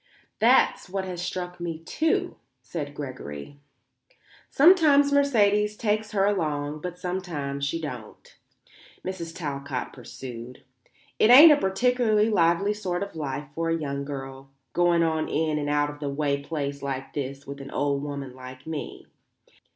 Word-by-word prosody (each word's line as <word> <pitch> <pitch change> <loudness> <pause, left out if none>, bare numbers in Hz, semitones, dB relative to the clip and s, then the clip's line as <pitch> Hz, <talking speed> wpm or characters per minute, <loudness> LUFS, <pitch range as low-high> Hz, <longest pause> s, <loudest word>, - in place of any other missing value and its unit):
"That's - - +4
what 190 0 -3
has 180 -2 -5
struck 180 -1 -4
me, 170 -2 -4
too," 325 - -1 0.3
said 145 +2 -6
Gregory. 130 - -7 0.9
"Sometimes 290 -3 +6
Mercedes 210 -7 +3
takes 215 0 -1
her 195 -1 +3
along; 150 -6 -1
but 180 +1 -5
sometimes 165 -7 -3
she 155 +4 -2
don't," 125 -9 -8 0.7
Mrs. 180 -3 -5
Talcott 140 -5 -4
pursued. 125 -1 -9 0.6
"It 215 - +5
ain't 295 +6 +11
a - - +7
particularly 225 -1 +2
lively 175 +2 +3
sort 185 -3 -3
of 200 - -8
life 145 -1 -4
for 165 +1 -2
a 165 - +1
young 140 -2 -3
girl, 135 -1 -7 0.2
going 175 -1 +3
on 160 -1 0
in 155 0 0
an 145 0 -2
out 145 0 +1
of 145 - -13
the 145 -1 -3
way 140 0 -1
place 140 -2 -4
like 135 -1 -4
this 140 -1 -5
with 140 0 -8
an 135 - -8
old 140 -1 0
woman 140 -3 -5
like 130 0 -11
me. 160 -2 -6
160 Hz, 150 wpm, -26 LUFS, 140-195 Hz, 0.9 s, ain't